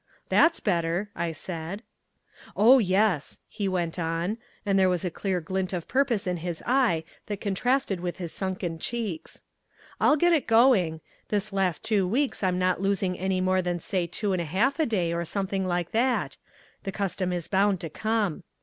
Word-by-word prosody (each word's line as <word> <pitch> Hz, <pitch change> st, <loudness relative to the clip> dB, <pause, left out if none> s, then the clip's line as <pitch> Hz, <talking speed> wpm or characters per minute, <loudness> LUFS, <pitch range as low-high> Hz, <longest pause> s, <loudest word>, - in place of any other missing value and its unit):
"That's 330 Hz, 0 st, +4 dB
better," 175 Hz, +1 st, 0 dB
I 170 Hz, 0 st, -1 dB
said. 170 Hz, +5 st, -5 dB, 0.7 s
"Oh, 245 Hz, +6 st, +7 dB
yes," 190 Hz, -, +1 dB
he 200 Hz, -, -3 dB
went 175 Hz, -2 st, -1 dB
on, 170 Hz, +6 st, -1 dB, 0.3 s
and 195 Hz, -1 st, +2 dB
there 190 Hz, -1 st, +5 dB
was 180 Hz, -1 st, -1 dB
a 180 Hz, -, -1 dB
clear 190 Hz, +1 st, -1 dB
glint 185 Hz, +3 st, -3 dB
of 175 Hz, -3 st, -3 dB
purpose 255 Hz, -6 st, +1 dB
in 180 Hz, -1 st, -1 dB
his 170 Hz, 0 st, -5 dB
eye 240 Hz, -11 st, +2 dB, 0.2 s
that 205 Hz, -2 st, -4 dB
contrasted 210 Hz, +1 st, 0 dB
with 175 Hz, 0 st, -4 dB
his 175 Hz, -3 st, -5 dB
sunken 185 Hz, -4 st, -3 dB
cheeks. 215 Hz, -6 st, -4 dB, 0.6 s
"I'll 300 Hz, -, +5 dB
get 345 Hz, +3 st, +4 dB
it 310 Hz, -, +1 dB
going. 225 Hz, -9 st, +4 dB, 0.3 s
This 210 Hz, 0 st, -1 dB
last 190 Hz, -4 st, 0 dB
two 200 Hz, -4 st, +1 dB
weeks 265 Hz, +8 st, 0 dB
I'm 185 Hz, -2 st, +1 dB
not 185 Hz, 0 st, +1 dB
losing 195 Hz, -2 st, +1 dB, 0.3 s
more 185 Hz, 0 st, +3 dB
than 175 Hz, -1 st, -1 dB
say 175 Hz, 0 st, -2 dB
two 200 Hz, +3 st, -2 dB
and 180 Hz, -, 0 dB
a -, -, -3 dB
half 220 Hz, -, +1 dB
a 315 Hz, -, +3 dB
day 180 Hz, -7 st, 0 dB
or 170 Hz, 0 st, -1 dB
something 195 Hz, +1 st, -2 dB
like 175 Hz, -1 st, -1 dB
that? 245 Hz, +3 st, +1 dB, 0.5 s
The 195 Hz, -, -4 dB
custom 190 Hz, -2 st, -2 dB
is 175 Hz, -2 st, -3 dB
bound 195 Hz, -1 st, +2 dB
to 165 Hz, -, -5 dB
come. 215 Hz, -5 st, -1 dB
190 Hz, 180 wpm, -27 LUFS, 175-215 Hz, 0.7 s, Oh